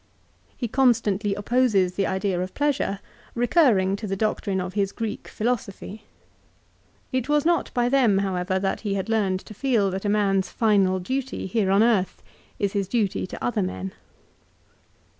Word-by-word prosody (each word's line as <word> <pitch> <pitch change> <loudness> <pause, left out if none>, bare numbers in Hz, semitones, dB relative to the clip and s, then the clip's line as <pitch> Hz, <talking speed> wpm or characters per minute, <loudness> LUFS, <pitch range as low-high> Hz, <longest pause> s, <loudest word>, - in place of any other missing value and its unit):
2 - - -34
He 240 - -2
constantly 220 -5 +2
opposes 205 -4 +2
the 195 +1 0
idea 190 -1 -1
of 185 0 -5
pleasure, 285 -8 0 0.4
recurring 235 - +3
to 210 +1 -6
the 195 - -2
doctrine 200 -2 -1
of 185 0 -4
his 200 -1 0
Greek 225 -2 -5
philosophy. 215 -2 -4 1.1
It 255 +1 -2
was 295 0 +2
not 340 0 +1
by 245 -1 +2
them, 245 -6 +3
however, 190 -1 -1
that 195 0 -1
he 205 -3 -2
had 195 +2 -3
learned 195 -4 +1
to - - -12
feel 215 -4 +1
that 190 +1 -4
a 205 - 0
man's 195 -2 +1
final 200 -4 +2
duty 260 +7 -3
here 195 0 0
on 200 +3 +4
earth 205 -6 +1 0.3
is 200 -1 -1
his 200 -2 -1
duty 205 -4 -1
to - - -8
other 120 - 0
men. 95 +1 -4
205 Hz, 165 wpm, -24 LUFS, 190-235 Hz, 1.1 s, on